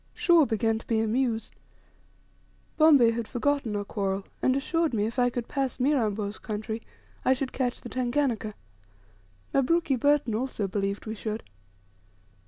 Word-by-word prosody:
Shaw 335 -5 +5
began 225 0 +1
to - - -16
be 225 -2 +1
amused. 225 +1 0 1.2
Bombay 285 -7 +6
had 230 -1 -3
forgotten 265 -3 0
our 205 - -1
quarrel, 195 -2 -2 0.2
and 260 - +3
assured 320 0 0
me, 210 -1 +1
if 230 +3 -3
I 245 0 +4
could 240 -1 -4
pass 270 -2 -2
Mirambo's 220 -7 0
country, 220 +1 -4 0.4
I 260 - +4
should 265 0 -3
"catch 250 -2 -2
the 240 - -8
Tanganika;" 245 -4 -1 1.0
Mabruki 280 +2 +2
Burton 285 -2 +2
also 220 -3 -2
believed 200 +1 -2
we 220 - -4
should. 220 0 -4
235 Hz, 145 wpm, -27 LUFS, 220-270 Hz, 1.2 s, Bombay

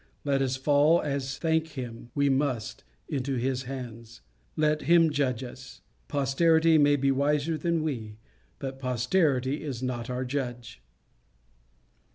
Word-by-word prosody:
Let 140 -1 +1
us 130 -1 0
fall, 145 +5 +4
as, 140 -2 -3
thank 160 -1 +1
him, 120 -3 -7
we 140 -1 +2
must, 130 -5 -1 0.2
into 135 -2 -2
his 130 +1 -1
hands. 115 -3 -8 0.3
Let 155 -1 +1
him 165 -2 +6
judge 135 -4 0
us. 125 0 -10 0.3
Posterity 160 +3 +3
may 145 0 +5
be 140 -1 +2
wiser 145 +3 +1
than 165 +1 0
we; 110 -8 -4 0.4
but 135 -1 -6
posterity 130 +2 +1
is 130 -5 -5
not 120 -2 -3
our 125 +1 -2
judge. 125 - -5
135 Hz, 135 wpm, -28 LUFS, 125-150 Hz, 0.4 s, him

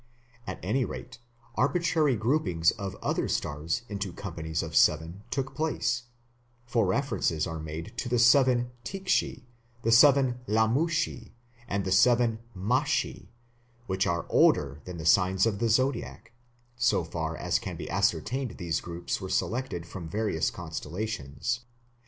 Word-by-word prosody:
At - - -5
any 135 0 +1
rate 125 0 -7 0.3
arbitrary 155 -1 +2
groupings 105 - +2
of 100 -4 -6
other - - 0
stars 80 +9 -2
into 100 -2 -4
companies 80 -4 -4
of - - -6
seven 80 +5 +3
took 135 +1 -2
place, 125 -6 -1 0.6
for 115 -4 +1
references 95 - 0
are 80 -2 -5
made 80 +1 -6
to 120 - -3
the 120 - +2
seven 125 0 +4
Tikshi, 185 -7 -1 0.4
the 115 - +2
seven 130 0 +6
Lumashi, 120 +3 +1 0.3
and 100 -3 -1
the 95 - -2
seven 115 +2 +4 0.2
Mashi, 125 +10 0 0.6
which 95 -2 0
are 85 -1 -1
older 70 0 +3
than 90 -1 -7
the 80 - -6
signs 95 +3 +4
of 105 -3 0
the 115 0 +1
Zodiac; 115 -2 0 0.4
so 115 -6 +2
far 80 -1 -4
as - - 0
can - - -6
be - - -6
ascertained 130 -2 0
these 85 -3 -2
groups 85 +3 -4
were 95 - -5
selected 115 -4 -1
from 85 -1 -8
various 105 -5 0
constellations. 85 - -4
110 Hz, 140 wpm, -28 LUFS, 85-125 Hz, 0.6 s, seven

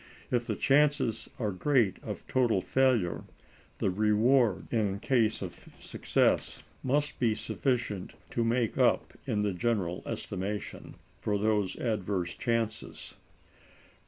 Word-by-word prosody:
If 120 -1 +1
the - - -1
chances 135 -5 +2
are 110 -5 -1
great 115 0 +2
of - - -6
total 120 -6 +2
failure, 120 -6 +1 0.5
the 95 - +1
reward 110 +2 +3
in 105 -4 +1
case 110 -3 +1
of 90 - -5 0.3
success - - 0 0.2
must 145 +3 0
be 115 -3 +2
sufficient 110 -3 -2 0.2
to 120 - 0
make 115 0 0
up, - - +3
in 105 -1 +1
the 100 -2 0
general 95 -4 -1
estimation, 100 +3 -4 0.3
for 105 -1 0
those 105 -2 +1
adverse 100 -6 -2
chances. 115 -2 -2
110 Hz, 120 wpm, -30 LUFS, 100-125 Hz, 0.5 s, reward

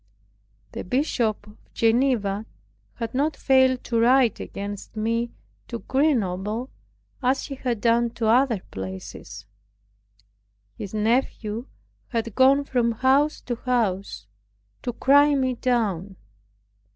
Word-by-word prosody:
The - - -5
Bishop 235 - 0
of 210 0 -16 0.2
Geneva 225 -3 +1 0.5
had 230 -1 -5
not 290 +4 0
failed 260 -2 +3
to 230 -1 0
write 245 -1 +4
against 200 +1 -7
me 230 +2 -1 0.4
to 235 - -4
Grenoble, 230 - 0 0.5
as 260 +1 +1
he 280 - -6
had 250 -4 -2
done 235 0 +3
to 230 - -2
other 235 -2 +3
places. 95 +2 -8 1.3
His 200 +1 -7
nephew 225 +1 0 0.4
had 230 -2 -3
gone 270 +3 +5
from 240 -4 0
house 270 +6 +2
to 240 -2 -4
house 200 - -1 0.6
to 245 - -2
cry 285 +4 +4
me 260 -2 +1
down. 210 -7 -1
235 Hz, 115 wpm, -24 LUFS, 210-260 Hz, 1.3 s, gone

